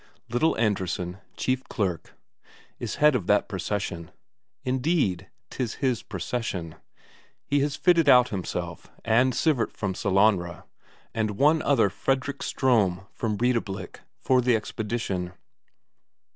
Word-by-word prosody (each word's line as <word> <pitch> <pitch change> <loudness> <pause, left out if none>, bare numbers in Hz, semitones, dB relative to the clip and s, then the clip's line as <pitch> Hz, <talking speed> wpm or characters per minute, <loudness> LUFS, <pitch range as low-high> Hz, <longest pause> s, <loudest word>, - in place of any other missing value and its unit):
Little 125 +8 +2
Andresen, 95 -4 -1 0.2
chief 130 0 0
clerk, 95 -7 -3 0.6
is - - -4
head 150 0 +5
of 110 -9 -1
that 105 0 +3
procession; 95 -3 -3 0.5
indeed, 130 - 0 0.2
'tis 120 -4 -3
his 130 -4 0
procession; 95 -4 -4 0.7
he 145 - +1
has 145 0 0
fitted 170 -4 +4
out 125 -1 +7
himself, 90 -3 -4 0.2
and 120 +3 +4
Sivert 145 -8 +1
from 100 -3 -2
Sellanraa, 95 -4 +1 0.5
and 110 -3 -1
one 155 +3 +4
other, 115 -9 +3
Fredrik 135 +4 -1
Ström 100 -8 +1
from 110 -3 -2
Breidablik, 110 -6 -1 0.2
for 130 -1 +2
the 125 -1 +3
expedition. 105 -5 -3
110 Hz, 115 wpm, -26 LUFS, 95-130 Hz, 0.7 s, out